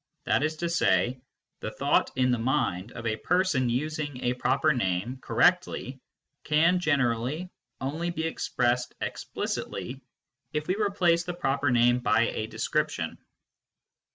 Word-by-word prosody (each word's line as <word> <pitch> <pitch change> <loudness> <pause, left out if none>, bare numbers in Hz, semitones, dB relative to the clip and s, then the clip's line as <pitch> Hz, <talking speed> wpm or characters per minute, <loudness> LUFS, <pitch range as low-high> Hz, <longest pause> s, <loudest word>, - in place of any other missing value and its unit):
Jfhat - - +2
is 155 +1 0
to 170 +2 -2
say, 125 - +2 0.4
the - - -4
thought - - +1
in 125 -1 +2
the 125 - +1
mind 115 -5 0
of 115 - -8
a 110 -1 0
person 175 - +1
using 145 +1 -2
a 125 - +2
proper 135 +5 +2
name 110 +2 -1
correctly 135 +1 +1 0.4
can 165 +4 +3
generally 145 +2 0 0.3
only 155 +6 -2
be 160 -2 -3
expressed 125 -6 0
explicitly 130 +2 -4 0.5
if 150 0 -1
we 185 - 0
replace 190 -5 +2
the 175 -1 -5
proper 140 -4 0
name 120 0 +4
by 105 -3 +3
a 110 - -3
description. - - -2
135 Hz, 135 wpm, -27 LUFS, 120-165 Hz, 0.5 s, name